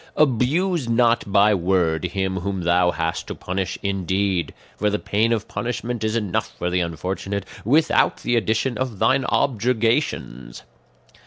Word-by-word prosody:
"Abuse 150 +3 +1
not 115 -2 +2
by 105 +1 +5
word 85 -3 +1
him 95 +1 -2
whom 95 +1 -3
thou 90 +1 +3
hast 80 -1 -2
to - - -5
punish 95 +1 -3
in 100 -1 -1
deed, 95 -1 0 0.2
for 105 - 0
the 105 - 0
pain 110 +3 0
of 110 -1 -1
punishment 120 -1 -3
is 110 +1 0
enough 105 -6 -2
for 90 - -2
the 90 - +1
unfortunate 95 +3 -3 0.2
without 150 +8 +3
the 120 - +1
addition 115 +2 0
of 130 -5 -3
thine 130 +5 +2
objurgations. 115 - 0
105 Hz, 150 wpm, -22 LUFS, 95-120 Hz, 0.2 s, by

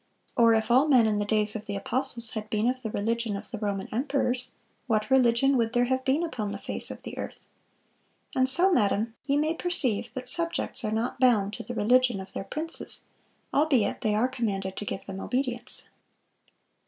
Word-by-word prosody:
Or 230 -1 +5
if 220 +1 0
all 260 +5 +5
men 255 -6 +5
in 210 -1 +1
the 205 - -1
days 210 0 +1
of 215 - -6
the 205 - -3
apostles 240 +2 -1
had 215 -1 -5
been 215 +2 0
of 255 +1 -1
the 225 - -4
religion 225 +1 -1
of 205 +3 -10
the 225 - -5
Roman 200 -2 -2
emperors, 255 0 -1 0.4
what 215 -1 0
religion 265 +1 +4
would 230 -1 0
there 245 0 +3
have 260 +1 -1
been 275 +6 +1
upon 235 -11 -3
the - - -4
face - - -4
of - - -8
the - - -7
earth?... - - -7 0.9
And 260 0 +3
so, 365 +7 +3
madam, 220 -1 +1
ye 280 0 +1
may 310 +2 +1
perceive 255 - -1
that 255 -1 -5
subjects 335 -3 +3
are 215 - -1
not 225 +4 -2
bound 215 -6 +3
to - - -6
the 245 - -6
religion 245 0 +3
of 190 - -9
their - - -4
princes, 320 +7 -4 0.5
albeit 275 -8 +2
they 210 -1 +1
are 225 +4 +2
commanded 200 -7 -3
to 210 - -4
give 195 - -5
them 195 -1 -6
obedience." 245 +1 -2
235 Hz, 200 wpm, -27 LUFS, 215-260 Hz, 0.9 s, Or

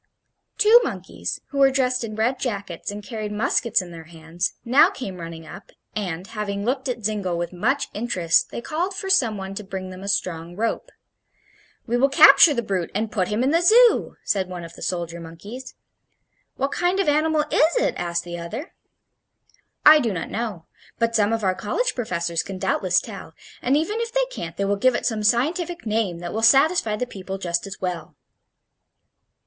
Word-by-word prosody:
Two 430 +3 +7
monkeys, - - -5
who 280 - -4
were 275 0 +6
dressed 255 -2 0
in 215 -2 -5
red 240 +4 0
jackets 200 -8 -4
and 205 +1 -6
carried 215 -2 -5
muskets 210 0 +1
in 175 - -11
their 165 -1 -10
hands, 165 +1 -4
now 275 +8 +6
came 225 - -7
running 165 -1 -8
up, 175 +5 -12 0.2
and, 185 -4 -3
having 205 -2 -4
looked 265 +2 -1
at 240 -3 -4
Zingle 200 -5 -1
with 175 +1 -4
much 250 +11 0
interest, 185 -7 +1
they - - -6
called 350 +8 -2
for 385 0 -3
some 235 - +3
one 190 0 -6
to 210 - -6
bring 190 -1 -6
them 185 0 -10
a 200 - -7
strong 175 -4 -2
rope. 225 +3 -2 1.0
"We 240 +1 0
will 275 +3 +3
capture 275 +2 +8
the 235 - -1
brute 190 -5 -2
and 215 +1 -1
put 185 -4 0
him 215 +4 -1
in 270 - +2
the 335 +2 +3
Zoo," 460 +6 +5
said 190 -2 -1
one 180 -1 -6
of 165 0 -10
the - - -14
soldier 170 -2 -3
monkeys. 200 +11 -10 0.8
"What 275 +1 -1
kind 355 +2 0
of 390 - +1
animal 305 +1 +2
is 320 +7 +3
it?" - - +1
asked 170 -1 -2
the 175 0 -7
other. 220 - -7 1.1
"I 305 0 +9
do 235 -6 0
not 180 -4 -5
know. 215 -8 -4 0.3
But 230 0 0
some 210 -1 +3
of 225 -1 -1
our 190 -1 +2
college 480 - -1
professors 170 -8 -2
can 195 -1 -7
doubtless 185 -1 +1
tell, 195 -7 -10 0.3
and 265 +3 +2
even 415 +9 -1
if 465 0 -3
they - - +1
can't 165 - -7
they 200 - 0
will 200 +1 0
give 255 +4 +3
it - - -2
some 220 -3 0
scientific 320 +11 0
name 215 -5 -1
that 175 - -5
will 220 - -2
satisfy 270 0 +4
the 250 - -2
people 195 -4 -7
just 175 0 -2
as 195 - -8
well." 175 -4 -4
215 Hz, 195 wpm, -23 LUFS, 185-270 Hz, 1.1 s, I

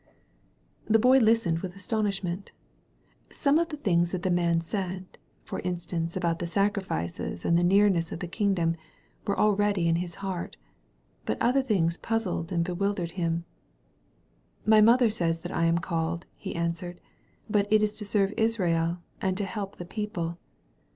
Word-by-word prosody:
The 225 - +5
Boy 255 +4 +6
listened 220 -8 +3
with 180 0 -6
astonishment. 195 -2 -2 0.8
Some 290 +1 +2
of 340 0 0
the 300 - -5
things 175 -9 +2
that 180 -1 -3
the 185 - +1
man 170 -1 +2
said 185 +1 -5
— - - -39
for - - -4
instivnce, 170 -2 -3
about 170 -2 0
the 175 - -2
sacrifices 185 - -2
and 170 - +3
about 170 - +4
the 175 - +3
nearness 190 -4 +3
of - - -5
the 180 - -4
king 200 +2 +1
dom 165 -2 +1 0.3
— - - -27
were 200 - 0
already 205 -4 +2
in 165 0 +3
his 175 -1 -4
heart. 190 -3 -5 0.7
But - - -1
other 255 +3 +3
things 180 -9 +1
puzzled 195 -7 -2
and 170 -2 +1
bewildered 180 -1 -1
him. 170 -1 -1 1.2
*'My 215 0 +6
mother 235 +1 +6
says 165 -5 0
that - - -5
I 165 - +2
am 165 0 +3
called," 170 0 -2
he - - -6
answered, 170 +1 -3 0.5
*'but 205 -1 +1
it 215 0 +5
is 210 0 0
to 215 - -4
serve 200 -1 +1
Israel 175 -7 +1 0.2
and 185 -1 0
to 205 - 0
help 200 0 -5
the 175 - -7
people. 175 -4 -4
185 Hz, 170 wpm, -27 LUFS, 170-210 Hz, 1.2 s, Boy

